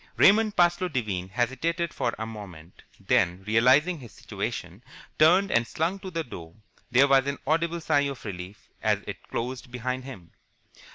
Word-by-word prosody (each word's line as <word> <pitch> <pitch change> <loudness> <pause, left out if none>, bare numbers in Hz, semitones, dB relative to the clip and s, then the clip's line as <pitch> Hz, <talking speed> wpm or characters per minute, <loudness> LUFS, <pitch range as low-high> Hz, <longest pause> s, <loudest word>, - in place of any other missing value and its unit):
Raymond 215 +1 +5
Parsloe 175 +1 +3
Devine 100 -9 -2
hesitated 135 - -1
for 120 - -1
a 110 - -4
moment, 95 -7 -10 0.2
then, 90 +1 +1
realizing 130 - +4
his 120 -5 -12
situation, - - -6 0.4
turned 180 +6 +5
and 120 0 +2
slunk 175 +5 -2
to 190 - -6
the 165 -2 -3
door. 85 - -10 0.3
There 130 +3 +5
was 135 -1 +4
an 140 - -2
audible 165 +3 0
sigh 145 -2 +2
of 135 -4 -8
relief 95 0 -8
as - - +1
it - - -7
closed 125 +1 -4
behind 125 +1 -3
him. 95 -11 -10
130 Hz, 160 wpm, -26 LUFS, 110-165 Hz, 0.4 s, Raymond